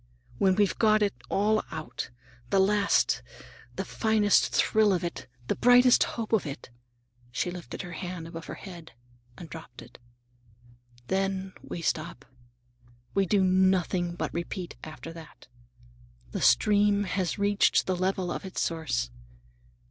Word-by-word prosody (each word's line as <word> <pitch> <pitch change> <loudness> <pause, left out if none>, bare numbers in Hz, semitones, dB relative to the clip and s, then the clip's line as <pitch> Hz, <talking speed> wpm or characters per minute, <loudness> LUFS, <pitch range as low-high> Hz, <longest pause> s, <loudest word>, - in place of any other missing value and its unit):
When 190 -1 +4
we've 205 -1 +1
got 215 -1 +4
it 200 - +1 0.2
all 215 +2 +2
out,—the 120 +6 -5
last, 200 +1 +3 0.5
the - - -3
finest 215 -2 +3
thrill 215 -2 +3
of 180 - -1
it, 170 -6 -5 0.2
the - - 0
brightest 245 0 +6
hope 230 -1 -4
of 220 - +4
it,"—she 120 +1 -8
lifted 180 +1 -7
her 175 - -8
hand 180 -2 -6
above 165 0 -8
her - - -6
head 175 -7 -11 0.4
and 170 - -9
dropped 155 -8 -10
it,—"then 120 - -7
we 170 - -7
stop. 155 -4 -2 0.9
We 195 -1 +2
do 200 +1 +3
nothing 185 -1 +2
but - - -3
repeat 170 +1 -5
after 160 +1 -8
that. 160 -5 -13 0.8
The - - -4
stream 205 - +4
has 185 -1 -2
reached 200 0 +3
the 185 - 0
level 185 0 -1
of - - -4
its 190 -1 -5
source. 105 - -1
175 Hz, 135 wpm, -28 LUFS, 125-200 Hz, 0.9 s, brightest